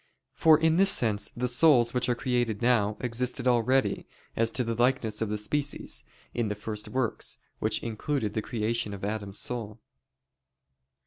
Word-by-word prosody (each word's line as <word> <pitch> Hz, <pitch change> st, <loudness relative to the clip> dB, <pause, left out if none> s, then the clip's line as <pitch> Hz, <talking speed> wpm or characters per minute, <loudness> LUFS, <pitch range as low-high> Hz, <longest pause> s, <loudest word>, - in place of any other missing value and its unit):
For 160 Hz, -1 st, +5 dB
in 160 Hz, 0 st, +2 dB
this 195 Hz, +1 st, +7 dB
sense, 105 Hz, -, +3 dB
the 125 Hz, +1 st, -1 dB
souls 125 Hz, -2 st, +4 dB
which 125 Hz, 0 st, 0 dB
are 120 Hz, -, +1 dB
created 120 Hz, -3 st, -2 dB
now, 110 Hz, -4 st, +2 dB
existed 125 Hz, +2 st, -1 dB
already, 125 Hz, +2 st, +1 dB, 0.3 s
as 115 Hz, 0 st, +1 dB
to 125 Hz, -, +1 dB
the 115 Hz, -1 st, -2 dB
likeness 115 Hz, -2 st, 0 dB
of 110 Hz, -, -1 dB
the 105 Hz, -, -2 dB
species, 145 Hz, +7 st, -2 dB, 0.3 s
in 120 Hz, -2 st, -1 dB
the 105 Hz, -, -3 dB
first 105 Hz, 0 st, -5 dB
works, 130 Hz, -4 st, -3 dB, 0.2 s
which -, -, 0 dB
included 115 Hz, 0 st, -3 dB
the 110 Hz, -, -2 dB
creation 115 Hz, -2 st, -3 dB
of 100 Hz, -, -7 dB
Adam's 105 Hz, -1 st, -4 dB
soul. 115 Hz, -3 st, -3 dB
120 Hz, 165 wpm, -27 LUFS, 105-125 Hz, 0.3 s, this